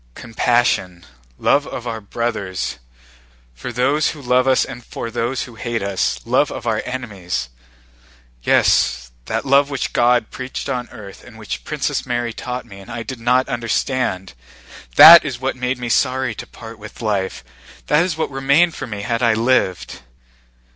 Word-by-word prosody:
"Compassion, 115 Hz, -7 st, 0 dB, 0.3 s
love 145 Hz, 0 st, +2 dB
of 120 Hz, -, -7 dB
our 115 Hz, -2 st, -4 dB
brothers, 100 Hz, -, -3 dB, 0.7 s
for -, -, -7 dB
those 135 Hz, +6 st, +1 dB
who 155 Hz, -, -7 dB
love 125 Hz, +1 st, +2 dB
us 130 Hz, -1 st, +3 dB
and 125 Hz, -2 st, -9 dB
for 115 Hz, 0 st, -6 dB
those 120 Hz, +3 st, -2 dB
who 125 Hz, -, -11 dB
hate 115 Hz, -1 st, -3 dB
us, 100 Hz, -1 st, -1 dB
love 130 Hz, +5 st, +2 dB
of 120 Hz, -, -7 dB
our 110 Hz, -2 st, 0 dB
enemies; 95 Hz, -, -4 dB, 0.9 s
yes, 60 Hz, 0 st, +2 dB
that 110 Hz, +3 st, -3 dB
love 140 Hz, +1 st, +4 dB
which 140 Hz, -3 st, -3 dB
God 120 Hz, -2 st, +2 dB
preached 130 Hz, +2 st, -6 dB
on 125 Hz, -3 st, -3 dB
earth 100 Hz, -2 st, -11 dB
and 120 Hz, -2 st, -14 dB
which 110 Hz, -1 st, -6 dB
Princess 145 Hz, -2 st, -2 dB
Mary 120 Hz, -2 st, -2 dB
taught 125 Hz, +2 st, -5 dB
me 100 Hz, -4 st, -12 dB
and 95 Hz, -, -13 dB
I 115 Hz, -, -5 dB
did 120 Hz, +2 st, -7 dB
not 125 Hz, +3 st, +2 dB
understand—that 95 Hz, -, +4 dB
is 135 Hz, -5 st, -4 dB
what 135 Hz, +1 st, -2 dB
made 125 Hz, 0 st, -2 dB
me 125 Hz, -1 st, -5 dB
sorry 130 Hz, +1 st, +1 dB
to -, -, -9 dB
part 115 Hz, -1 st, -11 dB
with 110 Hz, +2 st, -11 dB
life, 100 Hz, -, -2 dB, 0.4 s
that 150 Hz, +3 st, +3 dB
is 175 Hz, -4 st, -2 dB
what 160 Hz, -, -2 dB
remained 140 Hz, +6 st, +3 dB
for 135 Hz, -, -6 dB
me 105 Hz, -3 st, -6 dB
had 115 Hz, +2 st, -1 dB
I 115 Hz, -2 st, +3 dB
lived. 110 Hz, -, 0 dB
120 Hz, 165 wpm, -19 LUFS, 105-130 Hz, 0.9 s, love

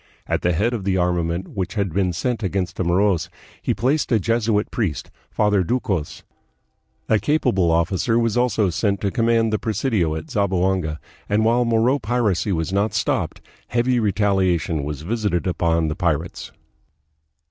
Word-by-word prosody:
At -, -, -1 dB
the 90 Hz, -, +1 dB
head 110 Hz, +9 st, +1 dB
of 110 Hz, -5 st, -3 dB
the 95 Hz, -1 st, +1 dB
armament 90 Hz, 0 st, -1 dB
which 95 Hz, 0 st, -4 dB
had 100 Hz, -5 st, -1 dB
been 95 Hz, -2 st, +1 dB
sent 120 Hz, +7 st, -2 dB
against 95 Hz, -2 st, -2 dB
the -, -, 0 dB
Moros 90 Hz, -1 st, +1 dB, 0.3 s
he -, -, -1 dB
placed 135 Hz, +8 st, 0 dB
a 115 Hz, -, +4 dB
Jesuit 115 Hz, 0 st, 0 dB
priest, 90 Hz, -, -2 dB, 0.2 s
Father 105 Hz, -3 st, +2 dB
Ducos. 95 Hz, -, -2 dB, 0.8 s
A 110 Hz, -, +3 dB
capable 100 Hz, -, +1 dB
officer 90 Hz, +7 st, +1 dB
was 115 Hz, -2 st, +1 dB
also 120 Hz, -6 st, +2 dB
sent 100 Hz, +3 st, 0 dB
to 100 Hz, -, 0 dB
command 115 Hz, 0 st, +2 dB
the 110 Hz, -, +1 dB
presidio 105 Hz, -, 0 dB
at 80 Hz, 0 st, -7 dB
Zamboanga, 95 Hz, -5 st, 0 dB, 0.3 s
and 105 Hz, +2 st, +2 dB
while 120 Hz, +2 st, +3 dB
Moro 115 Hz, +4 st, +2 dB
piracy 110 Hz, -4 st, 0 dB
was 80 Hz, +1 st, -1 dB
not 100 Hz, +2 st, +1 dB
stopped, -, -, -1 dB, 0.3 s
heavy 120 Hz, +1 st, +1 dB
retaliation 95 Hz, -7 st, +1 dB
was 75 Hz, 0 st, -5 dB
visited 100 Hz, -4 st, -1 dB
upon 85 Hz, -2 st, +1 dB
the 75 Hz, -, -2 dB
pirates. 85 Hz, -1 st, -2 dB
100 Hz, 160 wpm, -22 LUFS, 85-115 Hz, 0.8 s, a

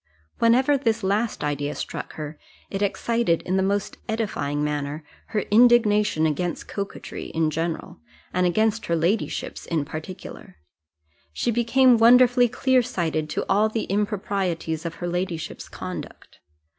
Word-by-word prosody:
Whenever 255 Hz, +5 st, +4 dB
this 225 Hz, -4 st, 0 dB
last 205 Hz, +4 st, 0 dB
idea 145 Hz, 0 st, -2 dB
struck -, -, -6 dB
her, 150 Hz, -1 st, -7 dB, 0.3 s
it 195 Hz, -, -3 dB
excited, 205 Hz, -2 st, +1 dB
in 185 Hz, -, -1 dB
the 190 Hz, -, +3 dB
most 200 Hz, +1 st, -1 dB
edifying 150 Hz, -10 st, -1 dB
manner, 150 Hz, +1 st, -3 dB, 0.2 s
her 215 Hz, -2 st, -1 dB
indignation 210 Hz, -6 st, +5 dB
against 165 Hz, +3 st, -2 dB
coquetry 200 Hz, -1 st, -6 dB
in 160 Hz, -1 st, +2 dB
general, 165 Hz, -, -3 dB, 0.3 s
and 180 Hz, 0 st, +2 dB
against 220 Hz, +4 st, +1 dB
her 170 Hz, -, +1 dB
ladyship's 175 Hz, +7 st, -1 dB
in 160 Hz, -4 st, -1 dB
particular: 155 Hz, -, -8 dB, 0.8 s
she 235 Hz, -, -1 dB
became 240 Hz, +1 st, +4 dB
wonderfully 245 Hz, +1 st, +6 dB
clear 260 Hz, +1 st, +3 dB
sighted 165 Hz, -10 st, -2 dB
to -, -, -2 dB
all 210 Hz, +2 st, +3 dB
the 220 Hz, 0 st, -2 dB
improprieties 195 Hz, -5 st, -1 dB
of 165 Hz, -, -6 dB
her 175 Hz, -, -5 dB
ladyship's 175 Hz, -2 st, -4 dB
conduct. -, -, -8 dB
195 Hz, 135 wpm, -24 LUFS, 160-225 Hz, 0.8 s, wonderfully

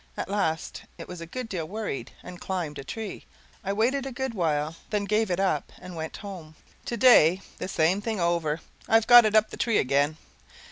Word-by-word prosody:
At -, -, -4 dB
last 165 Hz, -6 st, -1 dB, 0.2 s
it -, -, -9 dB
was 180 Hz, -2 st, -8 dB
a 165 Hz, -, -7 dB
good 250 Hz, +7 st, -5 dB
deal 175 Hz, -7 st, -4 dB
worried, 200 Hz, -, -5 dB
and 180 Hz, 0 st, -10 dB
climbed 170 Hz, -6 st, -3 dB
a -, -, -6 dB
tree. 215 Hz, +8 st, -6 dB, 0.4 s
I 195 Hz, -, -2 dB
waited 255 Hz, +7 st, 0 dB
a -, -, -5 dB
good 265 Hz, 0 st, -3 dB
while, 155 Hz, -4 st, -1 dB
then 205 Hz, -1 st, -1 dB
gave 215 Hz, +1 st, +1 dB
it 180 Hz, 0 st, -1 dB
up 185 Hz, -7 st, 0 dB
and 180 Hz, -1 st, -10 dB
went 160 Hz, -1 st, -5 dB
home. 170 Hz, -6 st, -9 dB, 0.3 s
Today 215 Hz, -8 st, +5 dB, 0.2 s
the -, -, -3 dB
same 185 Hz, +2 st, +1 dB
thing 220 Hz, -1 st, -3 dB
over. 170 Hz, -2 st, 0 dB, 0.3 s
I've 225 Hz, 0 st, +4 dB
got 240 Hz, -1 st, +9 dB
it 215 Hz, 0 st, +1 dB
up 215 Hz, 0 st, +4 dB
the -, -, -8 dB
tree 230 Hz, -3 st, +1 dB
again. 140 Hz, +3 st, +1 dB
185 Hz, 200 wpm, -26 LUFS, 160-220 Hz, 0.4 s, got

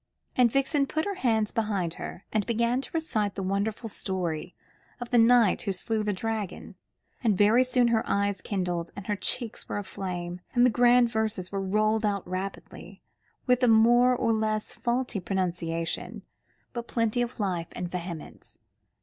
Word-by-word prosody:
And 245 Hz, -2 st, +4 dB
Vixen 275 Hz, +2 st, +2 dB
put 315 Hz, +3 st, -1 dB
her 405 Hz, -, -1 dB
hands 225 Hz, -, +1 dB
behind 200 Hz, -7 st, -1 dB
her, 175 Hz, -, -8 dB
and 215 Hz, -1 st, +2 dB
began 235 Hz, +2 st, +1 dB
to -, -, -5 dB
recite 240 Hz, -, -1 dB
the 195 Hz, -, -3 dB
wonderful 200 Hz, +4 st, -1 dB
story 180 Hz, -5 st, -3 dB, 0.4 s
of 245 Hz, -1 st, -7 dB
the 240 Hz, -, +5 dB
knight 230 Hz, -3 st, +5 dB
who 200 Hz, -, -1 dB
slew 215 Hz, +4 st, -2 dB
the 210 Hz, 0 st, 0 dB
dragon, 215 Hz, 0 st, -4 dB, 0.5 s
and 215 Hz, -5 st, +2 dB
very 215 Hz, +5 st, +5 dB
soon 250 Hz, -1 st, +2 dB
her 225 Hz, -1 st, +3 dB
eyes 200 Hz, -1 st, 0 dB
kindled 180 Hz, -4 st, -2 dB
and 200 Hz, -1 st, -8 dB
her 210 Hz, -, -1 dB
cheeks 225 Hz, +3 st, -2 dB
were -, -, -2 dB
aflame, 180 Hz, -3 st, -5 dB
and 245 Hz, 0 st, +6 dB
the 250 Hz, -, +4 dB
grand 245 Hz, 0 st, +4 dB
verses 215 Hz, -5 st, -2 dB
were 195 Hz, -1 st, -2 dB
rolled 215 Hz, +3 st, +1 dB
out 200 Hz, -3 st, -1 dB
rapidly, 185 Hz, +2 st, -6 dB, 0.4 s
with 250 Hz, 0 st, +3 dB
a 250 Hz, -, +4 dB
more 240 Hz, +3 st, +5 dB
or 230 Hz, -1 st, +1 dB
less 215 Hz, -1 st, -1 dB
faulty 240 Hz, -2 st, -1 dB
pronunciation, 175 Hz, -3 st, -3 dB, 0.5 s
but 235 Hz, -1 st, -5 dB
plenty 230 Hz, 0 st, 0 dB
of 240 Hz, 0 st, -3 dB
life 180 Hz, -5 st, -1 dB
and 175 Hz, -1 st, -5 dB
vehemence. 175 Hz, -3 st, -7 dB
215 Hz, 165 wpm, -27 LUFS, 190-240 Hz, 0.5 s, and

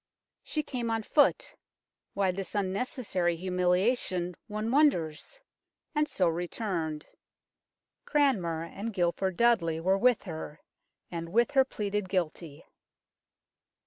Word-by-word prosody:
She 305 Hz, -, -2 dB
came 245 Hz, -5 st, -3 dB
on 225 Hz, -1 st, -1 dB
foot 310 Hz, -, +2 dB, 0.6 s
why 195 Hz, -2 st, +2 dB
this 195 Hz, +2 st, -6 dB
unnecessary 195 Hz, -3 st, -1 dB
humiliation, 180 Hz, +1 st, 0 dB
one 215 Hz, +2 st, -3 dB
wonders? 275 Hz, -, +1 dB, 0.5 s
and 300 Hz, -1 st, +2 dB
so 185 Hz, -, +1 dB
returned. 165 Hz, -2 st, -2 dB, 1.0 s
Cranmer 195 Hz, -, +1 dB
and 205 Hz, +5 st, -6 dB
Guilford 180 Hz, +1 st, 0 dB
Dudley 190 Hz, -10 st, +3 dB
were 190 Hz, +4 st, +2 dB
with 250 Hz, 0 st, +3 dB
her, 160 Hz, -3 st, -7 dB, 0.5 s
and 165 Hz, -1 st, -5 dB
with 235 Hz, +8 st, +2 dB
her 270 Hz, -2 st, +5 dB
pleaded 210 Hz, -5 st, -3 dB
guilty. 170 Hz, -4 st, -3 dB
190 Hz, 110 wpm, -29 LUFS, 170-235 Hz, 1.0 s, her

